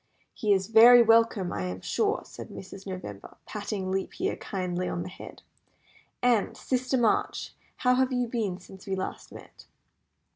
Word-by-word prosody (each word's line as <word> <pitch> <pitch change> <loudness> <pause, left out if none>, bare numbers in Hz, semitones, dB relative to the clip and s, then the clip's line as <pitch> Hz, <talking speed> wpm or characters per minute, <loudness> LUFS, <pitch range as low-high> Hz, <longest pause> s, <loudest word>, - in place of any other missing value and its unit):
"He 210 - -1
is 190 -1 +3
very 235 +3 +8
welcome, 225 -4 +3
I 95 -3 -3
am 90 0 -4
sure," - - 0
said - - -10
Mrs. 195 +1 -10
November, 145 - -8
patting 205 -3 -4
Leap 190 0 -3
Year - - 0
kindly 180 -2 -3
on 175 - -3
the 180 - -7
head. 180 - -11 0.8
"And, 240 -4 +2
Sister 255 0 -1
March, 230 -3 0 0.2
how 250 -2 +2
have 260 +1 +2
you 250 -1 +1
been 220 -6 -2
since 190 +1 -14
we 195 - -1
last 190 - -5
met?" - - -14
200 Hz, 160 wpm, -27 LUFS, 185-235 Hz, 0.8 s, very